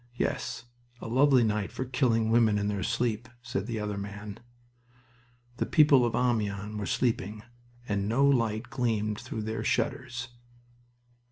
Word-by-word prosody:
"Yes, 120 - -2 0.3
a - - -7
lovely 130 +1 +4
night 105 -3 0
for 130 - -4
killing 120 -4 +1
women 115 -3 +4
in 100 0 0
their 100 -2 -2
sleep," 115 +2 -1
said 110 -4 -3
the 115 -2 -3
other 105 -1 -3
man. 100 +1 -7 1.2
The - - -1
people 145 -6 +5
of 115 - -2
Amiens 105 -4 0
were 105 - -3
sleeping, 110 -3 -1 0.4
and 100 -1 -1
no 135 +5 +3
light 115 -4 +1
gleamed 110 -4 -1
through 110 - -5
their 110 +1 -3
shutters. 125 +1 -1
115 Hz, 145 wpm, -29 LUFS, 105-125 Hz, 1.2 s, people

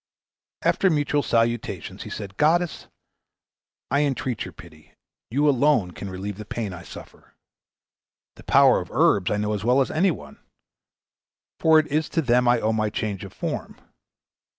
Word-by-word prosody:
After 190 - +3
mutual 145 -2 +1
salutations, 115 -2 -1
he - - -7
said, 100 -2 -7
"Goddess, 170 +3 +1 1.0
I 140 - +3
entreat 130 -4 -2
your - - -8
pity; 80 -2 -16 0.3
you 145 +5 +1
alone 135 -8 +3
can 100 +3 -7
relieve 95 +2 -6
the - - -5
pain 105 -2 -4
I 85 - -9
suffer. - - -13 1.0
The - - -15
power - - +5
of - - -7
herbs 95 -3 +3
I 105 - 0
know 105 +1 -1
as 105 -1 -3
well 125 +4 +3
as 135 - +1
any 180 +5 +2
one, 170 - -7 1.2
for 160 -1 +5
it 155 - +4
is 155 +1 -1
to 165 - 0
them 125 -1 +3
I 120 0 +4
owe 110 0 0
my 110 -1 0
change 105 -2 -4
of 100 - -9
form. - - -5
120 Hz, 165 wpm, -24 LUFS, 105-145 Hz, 1.2 s, power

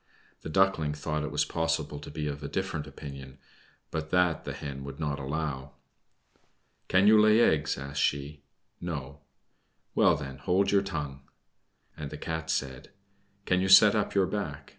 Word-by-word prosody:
The - - -7
Duckling 80 -4 +2
thought 75 +1 -3
it 75 - -3
was 75 0 +1
possible 80 -2 -2
to 75 - -10
be 75 +1 -4
of 70 0 -4
a 70 - -4
different 90 -3 -3
opinion, 70 -2 -9 0.5
but 80 0 -4
that 90 -2 +2
the - - -4
Hen 70 -1 -6
would 70 +1 -8
not 75 -2 -2
allow. 70 -1 -4 1.1
"Can 95 +1 +4
you 105 0 +7
lay 110 +1 +5
eggs?" 75 - +2
asked 70 +1 -4
she. 70 +1 -1 0.4
"No." 75 -5 -5 0.7
"Well, - - +4
then, 70 0 -7
hold 95 +7 +1
your 100 -1 +4
tongue." 75 -8 -5 0.7
And 75 -2 -6
the 75 - -7
Cat 80 +1 -4
said, 65 +1 -3 0.6
"Can 90 0 +2
you 95 - +1
set 100 +2 +9
up 105 -2 -1
your 95 -1 +4
back? 80 -8 -4
75 Hz, 165 wpm, -29 LUFS, 70-90 Hz, 1.1 s, set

